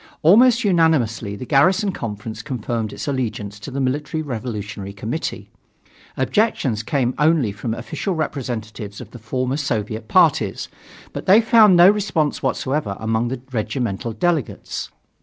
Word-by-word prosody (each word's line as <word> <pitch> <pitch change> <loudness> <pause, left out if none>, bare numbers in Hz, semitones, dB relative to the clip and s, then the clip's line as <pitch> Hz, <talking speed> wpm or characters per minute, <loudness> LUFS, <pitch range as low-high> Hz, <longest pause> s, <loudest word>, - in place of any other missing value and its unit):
Almost 235 +8 +6
unanimously 155 - +2
the 115 - -7
Garrison 185 - +3
Conference 110 - -6
confirmed 115 -5 -3
its - - -7
allegiance 110 -6 -3
to 120 - -8
the 135 +1 -4
Military 150 +4 -1
Revolutionary 105 -7 -5
Committee. 115 +10 -5 0.7
Objections 145 - +1
came 125 +1 0
only 150 -7 +3
from 110 +3 -4
official 190 - -4
representatives 115 -9 -4
of - - -10
the 120 - -10
former 130 +4 -2
Soviet 110 -5 -3
parties, - - +2 0.4
but - - -6
they 195 +4 +8
found 225 -4 +6
no 175 +1 +8
response 190 -7 +1
whatever 130 -4 -1
among 110 +1 0
the 125 0 -4
regimental 115 -2 -2
delegates. 155 +5 -2
130 Hz, 135 wpm, -21 LUFS, 110-160 Hz, 0.7 s, they